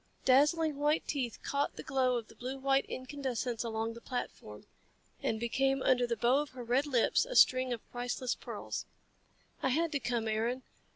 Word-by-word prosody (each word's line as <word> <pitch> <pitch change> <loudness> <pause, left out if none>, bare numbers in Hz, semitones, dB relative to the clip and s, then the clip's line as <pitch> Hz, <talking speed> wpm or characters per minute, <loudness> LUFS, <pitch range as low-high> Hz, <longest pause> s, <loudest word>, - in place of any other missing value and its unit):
Dazzling 295 +3 +4
white 295 +2 +1
teeth 255 -6 -2
caught 280 0 -1
the - - -7
glow 260 -2 +1
of 230 -2 -5
the - - -15
blue 255 +2 -5
white 270 0 +2
incandescents 255 -3 -3
along 225 0 -2
the 235 - -11
platform, 105 - -6 0.6
and 220 - -1
became 270 +3 +1
under 250 -1 +3
the 235 -1 -1
bow 245 +5 +3
of 295 -1 -3
her 250 -1 -7
red 250 +5 +1
lips 250 -5 +3
a - - -6
string 255 - +5
of 235 -2 -4
priceless 245 +1 -2
pearls. - - -6 0.7
"I - - +1
had 325 +5 +1
to 285 - 0
come, 240 -3 -1
Aaron. 230 +4 -1
255 Hz, 180 wpm, -32 LUFS, 235-275 Hz, 0.7 s, string